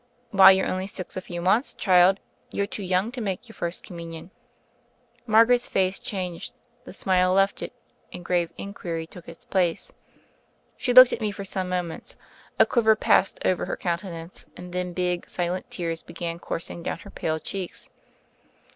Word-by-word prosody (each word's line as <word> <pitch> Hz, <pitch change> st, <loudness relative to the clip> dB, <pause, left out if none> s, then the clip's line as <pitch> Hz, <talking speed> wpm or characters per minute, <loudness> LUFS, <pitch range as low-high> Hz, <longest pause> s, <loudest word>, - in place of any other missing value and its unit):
"Why, 195 Hz, -1 st, +9 dB
you're 190 Hz, 0 st, +4 dB
only 185 Hz, +1 st, -2 dB
six 185 Hz, -2 st, -6 dB
a 185 Hz, -, -3 dB
few 175 Hz, -1 st, -6 dB
months, 215 Hz, +9 st, +2 dB
child; 185 Hz, 0 st, +5 dB, 0.3 s
youVe 200 Hz, 0 st, -2 dB
too -, -, -5 dB
young 190 Hz, +4 st, 0 dB
to 250 Hz, -1 st, -6 dB
make 200 Hz, +3 st, -3 dB
your 225 Hz, -, -13 dB
First 170 Hz, -3 st, -5 dB
Com 175 Hz, -, -9 dB
munion." 165 Hz, +1 st, -8 dB, 1.0 s
Margaret's 230 Hz, +3 st, +5 dB
face 190 Hz, 0 st, +1 dB
changed, 180 Hz, -4 st, -5 dB, 0.3 s
the -, -, -9 dB
smile 185 Hz, -1 st, +2 dB
left 195 Hz, +1 st, +2 dB
it, -, -, -5 dB, 0.4 s
and 175 Hz, -, -9 dB
grave 175 Hz, -2 st, +1 dB
inquiry 170 Hz, -5 st, -5 dB
took 170 Hz, +1 st, -12 dB
its 165 Hz, -, -12 dB
place. 180 Hz, -4 st, 0 dB, 0.8 s
She 250 Hz, -, -1 dB
looked 255 Hz, 0 st, +9 dB
at -, -, -3 dB
me 215 Hz, -, 0 dB
for 200 Hz, -1 st, -7 dB
some 190 Hz, -1 st, -3 dB
moments, 180 Hz, -2 st, -4 dB, 0.4 s
a -, -, +7 dB
quiver 220 Hz, -3 st, +4 dB
passed 195 Hz, -, +3 dB
over 185 Hz, -, +1 dB
her -, -, -3 dB
countenance, 170 Hz, -1 st, -4 dB
and 180 Hz, 0 st, -9 dB
then 180 Hz, -1 st, -2 dB
big 180 Hz, -1 st, -1 dB
silent 180 Hz, +1 st, -2 dB
tears 165 Hz, -2 st, -3 dB
began 170 Hz, 0 st, -6 dB
coursing 170 Hz, 0 st, -5 dB
down -, -, -3 dB
her 200 Hz, -, -13 dB
pale 160 Hz, 0 st, -2 dB
cheeks. 185 Hz, +3 st, -6 dB
185 Hz, 175 wpm, -25 LUFS, 175-195 Hz, 1.0 s, Why